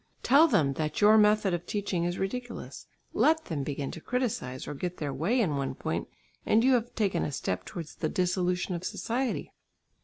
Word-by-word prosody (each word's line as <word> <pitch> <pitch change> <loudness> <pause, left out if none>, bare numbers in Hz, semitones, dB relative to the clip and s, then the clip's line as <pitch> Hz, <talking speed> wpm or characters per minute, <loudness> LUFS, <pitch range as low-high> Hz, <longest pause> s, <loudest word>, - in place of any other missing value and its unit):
Tell 290 +6 +6
them 155 - +2
that 155 -1 -2
your 210 +1 +7
method 210 -2 +4
of 175 0 -3
teaching 195 -4 -1
is 175 +1 -2
ridiculous, 240 +5 -5 0.3
let 320 0 +3
them 155 -4 -3
begin 140 0 -3
to 165 - -8
criticise 210 - -2
or - - -4
get 175 +5 -4
their 145 -3 -3
way 170 - +1
in 165 -11 +1
one 135 -1 -2
point - - -3 0.4
and 225 +2 +3
you 265 +1 +5
have 240 -1 0
taken 195 -6 +1
a - - -2
step 95 -8 -3
towards 165 -3 -7
the 155 - -2
dissolution 180 0 0
of 170 0 -4
society. 245 +6 -2
185 Hz, 190 wpm, -29 LUFS, 155-225 Hz, 0.4 s, your